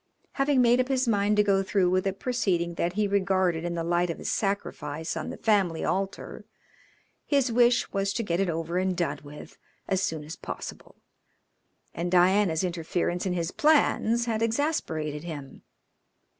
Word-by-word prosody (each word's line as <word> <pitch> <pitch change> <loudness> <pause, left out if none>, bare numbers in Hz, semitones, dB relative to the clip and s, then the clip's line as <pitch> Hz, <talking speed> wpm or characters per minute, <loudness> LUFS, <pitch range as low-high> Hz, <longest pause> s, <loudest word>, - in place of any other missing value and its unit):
Having 275 -2 +2
made 240 +1 +4
up 255 - +1
his 260 -2 0
mind 210 -1 +2
to 210 - +5
go 195 -1 +2
through 190 -2 +1
with 185 +1 +1
a - - +2
proceeding 190 -7 -1
that 170 +1 -1
he 210 +1 +1
regarded 185 -4 +1
in 175 0 -3
the 165 - -2
light 175 +1 +1
of 165 - -4
a - - -10
sacrifice 160 -6 -2
on - - -4
the - - -6
family 195 -7 +1
altar, 195 +1 -3 0.8
his 275 -4 +1
wish 240 +1 +3
was 195 0 0
to 230 - -2
get 170 -4 -1
it 195 -2 +1
over 165 +2 -2
and 185 -1 -1
done 150 -4 -1
with 150 +1 -12 0.3
as 190 -1 +1
soon 160 -5 -2
as 155 +2 -8
possible, - - -8 1.0
and 170 +2 -3
Diana's 180 -1 +3
interference 175 +1 -2
in 180 - 0
his 170 0 -2
plans 240 -6 +2
had 225 -2 -1
exasperated 200 - -1
him. 145 -5 -8
185 Hz, 170 wpm, -27 LUFS, 170-215 Hz, 1.0 s, to